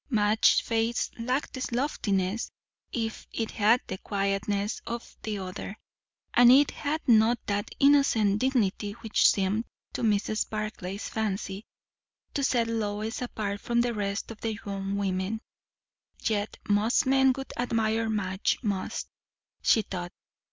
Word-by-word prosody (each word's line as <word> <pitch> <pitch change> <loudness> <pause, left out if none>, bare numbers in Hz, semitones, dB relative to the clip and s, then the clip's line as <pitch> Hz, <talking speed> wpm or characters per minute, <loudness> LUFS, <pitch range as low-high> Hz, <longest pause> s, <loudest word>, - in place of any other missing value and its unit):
Madge's 215 -3 +4
face 230 +1 0
lacked 250 +5 -1
the 260 - -4
loftiness, 210 -6 0 0.4
if 225 -2 -3
it 225 -1 -2
had 220 +4 +4
the 190 - -5
quietness, 200 +1 -1
of 235 0 -6
the 215 -1 -3
other; 190 +2 -6 0.6
and 245 0 +8
it 280 +3 +6
had 310 +2 -3
not 230 0 +5
that 205 0 -1
innocent 275 -8 +4
dignity 210 -5 +1
which 225 0 +3
seemed 200 +3 +1 0.3
to - - -3
Mrs. 215 0 +1
Barclay's 210 -2 -4
fancy 205 -1 -3 0.7
to 280 - -1
set 240 -3 +2
Lois 220 0 -2
apart 205 -4 -3
from 235 0 +1
the 240 0 0
rest 200 0 -3
of 220 - -11
young 200 -3 -3
women. 195 +2 -1 0.8
Yet 210 -2 -1
most 210 +3 +3
men 265 0 +5
would 270 - -6
admire 225 -2 0
Madge 195 -3 0
most, 200 -4 -2 0.5
she 220 - +4
thought. 175 -3 -5
215 Hz, 130 wpm, -28 LUFS, 200-235 Hz, 0.8 s, and